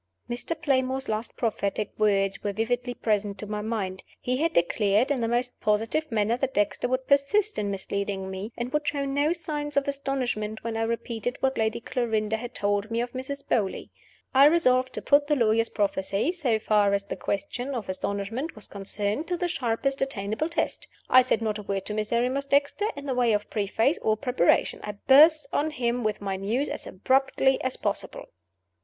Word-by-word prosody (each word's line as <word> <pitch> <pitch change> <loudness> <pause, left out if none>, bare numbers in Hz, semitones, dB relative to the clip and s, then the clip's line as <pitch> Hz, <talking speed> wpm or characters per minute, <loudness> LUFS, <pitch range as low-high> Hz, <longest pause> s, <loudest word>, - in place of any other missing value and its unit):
Mr. 245 +7 -3
Playmore's 265 -1 0
last 215 +1 -3
prophetic 210 -2 -1
words 195 -2 +2
were 205 - -1
vividly 245 +3 -1
present 205 -2 0
to 210 - -5
my 210 0 -3
mind. 205 -4 -3 0.2
He 250 +1 -1
had 325 +4 +1
declared, 205 +8 +2
in 265 -4 0
the 230 - +1
most 245 +2 -1
positive 225 +8 0
manner, 220 +1 +1
that 265 0 -2
Dexter 205 +3 +1
would 255 +1 -1
persist 365 +11 +2
in 205 -1 -1
misleading 195 0 -3
me, 195 +4 -5
and 240 +2 -4
would 300 0 0
show 285 -1 0
no 285 +3 +1
signs 300 -4 -3
of 280 - +2
astonishment 255 -6 -2
when 230 -1 -3
I 225 - -1
repeated 235 +1 -3
what 265 0 +1
Lady 220 0 0
Clarinda 220 -3 -1
had 245 +1 -8
told 205 +1 0
me 230 0 -1
of 240 0 -2
Mrs. 270 +2 -6
Beauly. 205 -5 -1 0.4
I 270 +1 +7
resolved 260 -5 +4
to - - -5
put 285 0 +4
the 295 - +3
lawyer's 230 -2 +2
prophecy 200 - 0
so 285 -11 0
far 210 -2 +3
as 200 - -2
the 200 - -5
question 245 +7 -3
of 230 -5 -4
astonishment 200 - -3
was 215 - -6
concerned 205 +7 -2
to 355 - -1
the 355 - -1
sharpest 270 -3 -1
attainable 235 +2 -1
test. 335 - -1 0.2
I 255 - +9
said 235 -3 0
not 215 -1 -1
a - - -5
word 195 -1 -3
to 210 - -4
Miserrimus 240 +6 0
Dexter 285 +10 +2
in 285 0 -8
the 270 - -1
way 245 -3 +2
of 210 0 -2
preface 220 - +1
or 215 0 +1
preparation: 250 -8 +2
I 210 - -4
burst 295 +8 +6
on 300 +2 +1
him 245 -4 -1
with 215 -1 -1
my 195 -1 -2
news 225 +9 -1
as - - -6
abruptly 265 +5 +2
as 260 0 -2
possible. - - -3
235 Hz, 190 wpm, -26 LUFS, 210-275 Hz, 0.4 s, I